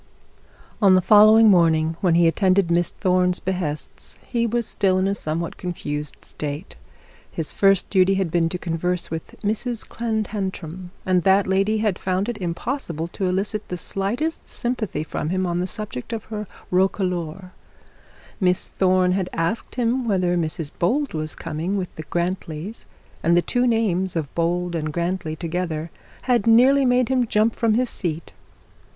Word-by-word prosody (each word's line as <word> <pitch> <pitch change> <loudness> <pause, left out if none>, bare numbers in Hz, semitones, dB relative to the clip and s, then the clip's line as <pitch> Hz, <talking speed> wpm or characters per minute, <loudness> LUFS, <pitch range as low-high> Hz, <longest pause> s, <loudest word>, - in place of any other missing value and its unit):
On 195 -2 +6
the - - +6
following 215 +4 +7
morning, 165 -4 +4
when 175 -3 +3
he 170 0 +5
attended 185 +1 +2
Miss 175 0 +2
Thorne's 180 -2 +1
behests, 175 -5 -4
he 235 -1 0
was 235 +1 0
still 190 -2 +1
in 185 +1 +1
a 195 - +1
somewhat 165 -2 -3
confused 150 -5 -5
state. 150 +5 -6 0.6
His 160 -3 -3
first 195 -2 +3
duty 190 0 +4
had 190 -4 -1
been 165 -1 +2
to 180 - -3
converse 175 0 -2
with 160 -1 -6
Mrs 220 +3 -2
Clantantram, 195 -6 -4 0.2
and 185 -1 +3
that 195 +2 +4
lady 195 +3 +1
had 195 -4 0
found 190 +2 -1
it 240 -3 -4
impossible 170 - -3
to 190 +1 -2
elicit 195 +3 -2
the 180 - -4
slightest 220 - -2
sympathy 235 -10 -3
from 155 0 -4
him 185 +1 0
on 175 -1 -1
the 180 - -1
subject 210 - -6
of 220 -1 -6
hr 210 -1 -3 0.3
roquelaure. 180 -2 0 0.9
Miss 180 -3 +2
Thorne 185 -1 +2
had 185 -1 -1
asked 165 +7 -2
him 245 0 0
whether 180 -4 +1
Mrs 160 -2 -2
Bold 275 +11 +1
was 155 -1 -3
coming 165 +5 -3
with 185 -2 -4
the 155 - -7
Grantlys; 175 +2 -3 0.4
and 170 +1 +3
the 175 - +3
two 245 0 +1
names 190 -6 +1
of 155 -4 -3
Bold 175 +1 0
and 155 -2 -2
Grantly 170 -1 -2
together 165 -1 -3 0.3
had 240 -4 +1
nearly 260 +4 +6
made 250 0 +3
him 255 -2 +2
jump 215 +1 +2
from 225 -2 +2
his 250 0 +1
seat. 165 -2 -3
185 Hz, 160 wpm, -23 LUFS, 170-215 Hz, 0.9 s, following